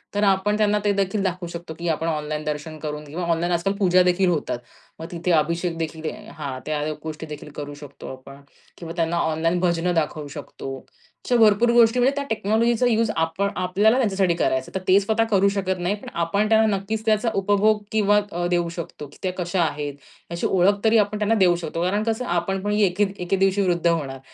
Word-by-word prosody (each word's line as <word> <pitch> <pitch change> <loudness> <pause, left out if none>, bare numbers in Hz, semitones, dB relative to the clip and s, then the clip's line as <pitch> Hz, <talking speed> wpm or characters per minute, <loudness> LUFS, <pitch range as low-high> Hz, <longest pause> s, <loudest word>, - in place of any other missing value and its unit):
तर 205 - +1
आपण 200 +1 +2
त्यांना 210 -1 +2
ते 205 - +4
देखील 195 +1 0
दाखवू 180 -1 -2
शकतो, 170 -1 -7
की 170 +2 -6
आपण 160 +1 -1
ऑनलाईन 150 -1 -2
दर्शन 150 +1 -4
करून 150 0 -5
घेऊ. 150 +4 -8
ऑनलाईन 170 +1 0
आजकाल 175 +4 0
पूजा 185 -2 +4
देखील 180 +1 +2
होतात. 155 -7 -1 0.4
मग 160 - -6
तिथे 175 +1 -2
अभिषेक 170 +2 +1
देखील 160 -1 -4 0.3
हां, 135 -4 -5
त्या 150 -1 -2 0.2
गोष्टी 160 0 -6
देखील 150 -1 -9
करू 145 0 -6
शकतो 145 -1 -11
आपण 135 +1 -12 0.4
किंवा 165 -1 -7
त्यांना 170 0 0
ऑनलाईन 165 +1 0
भजनं 175 0 +1
दाखवू 155 -2 -1
शकतो. 140 -2 -7 0.5
अशा 245 - +1
भरपूर 220 +1 +5
गोष्टी 235 +1 +5
म्हणजे 265 +3 +3
त्या 285 - -2
टेक्नॉलॉजीचा 225 +3 +1
युज 225 -1 +2
आपण 165 +5 0
आपल्याला 200 +6 +2
त्यांच्यासाठी 195 -7 +2
करायचं 130 -6 +1
आहे. - - -29
तर - - 0
ते 190 +2 +6
स्वतः 220 +3 +1
करू 200 0 +4
शकत 190 -2 -2
नाही. 180 +4 0 0.2
आपण 200 +6 0
त्यांना 220 -2 +4
नक्कीच 215 +3 -4
त्याचा 220 +1 +2
उपभोग 205 +2 +2
किंवा 210 -1 +3
अ, 175 +1 -2
देऊ 175 -1 +1
शकतो 165 -3 -7
की - - -17
त्या 185 - 0
कशा 175 0 -1
आहेत, 145 -2 -2 0.4
अशी 170 - -1
ओळख 195 +2 +3
तरी 225 0 +4
आपण 210 0 +1
त्यांना 215 +2 +2
देऊ 185 -4 +4
शकतो. 165 -1 -4
कारण 205 +4 0
कसं 225 +2 -1
आपण 175 0 -1
पण 205 - -1
एके 205 -1 +2
दि 195 - -6
एके 185 +2 0
दिवशी 195 +1 +2
वृद्ध 170 -1 +1
होणार 140 -6 -1
180 Hz, 205 wpm, -23 LUFS, 165-205 Hz, 0.5 s, ते